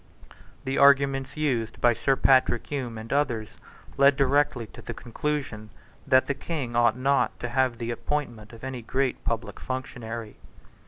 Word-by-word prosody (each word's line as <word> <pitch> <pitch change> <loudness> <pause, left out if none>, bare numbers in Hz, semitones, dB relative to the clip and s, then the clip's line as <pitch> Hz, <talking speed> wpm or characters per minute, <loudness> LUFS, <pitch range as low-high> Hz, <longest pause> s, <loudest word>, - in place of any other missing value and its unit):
The 135 +1 -1
arguments 140 -1 +4
used 120 -7 -1
by 120 -1 +4
Sir 135 +4 +1
Patrick 130 -2 +3
Hume 125 -6 -4
and 110 +3 -5
others 120 -7 -1 0.4
led 140 0 +6
directly 140 -2 +2
to - - -13
the - - -7
conclusion 120 -3 -4 0.4
that 130 -1 +5
the 140 - -1
King 140 -5 -4
ought 120 -1 +3
not 140 +2 +1
to 120 - -4
have 130 -1 +1
the 115 0 -3
appointment 120 -4 -4
of 115 0 -13
any 130 -2 -5
great 130 +3 -1
public 115 0 -3
functionary. 120 -4 -6
130 Hz, 155 wpm, -26 LUFS, 115-140 Hz, 0.4 s, led